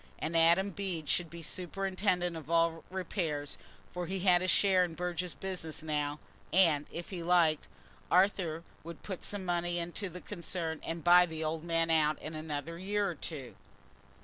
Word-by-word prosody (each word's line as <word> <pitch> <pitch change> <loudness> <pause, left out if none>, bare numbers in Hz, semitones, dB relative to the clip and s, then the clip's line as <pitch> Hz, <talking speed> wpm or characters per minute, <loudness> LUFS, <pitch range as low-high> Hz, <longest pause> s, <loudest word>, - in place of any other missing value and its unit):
And 160 +2 -3
Adam 170 +4 +5
Bede 180 -5 -4
should 170 +1 +1
superintend 185 +1 -1 0.3
all 165 0 +4
the 165 - -11
repairs, 165 -6 -2 0.3
for 180 -1 -3
he 190 +1 -3
had 180 -2 +5
a 185 - -1
share 185 0 +4
in 170 -2 -3
Burge's 180 +1 -3
business 180 -5 -4
now, 150 -1 -1 0.3
and, 165 -6 +4
if 170 +3 -7
he 180 -3 -4
liked, 170 -3 +3 0.4
Arthur 180 -4 +2 0.2
would 165 0 -9
put 190 -3 -6
some 200 -2 -4
money 175 0 0
into 175 +4 -2
the 180 +1 -8
concern 170 -4 -4
and 165 -1 -4
buy 180 +1 +7
the 160 -1 -5
old 155 0 -2
man 165 -1 +1
out 155 -1 +3
in 155 - -7
another 155 +1 -5
year 205 +2 0
or 180 - -2
two. 145 -5 -7
170 Hz, 170 wpm, -32 LUFS, 160-185 Hz, 0.4 s, buy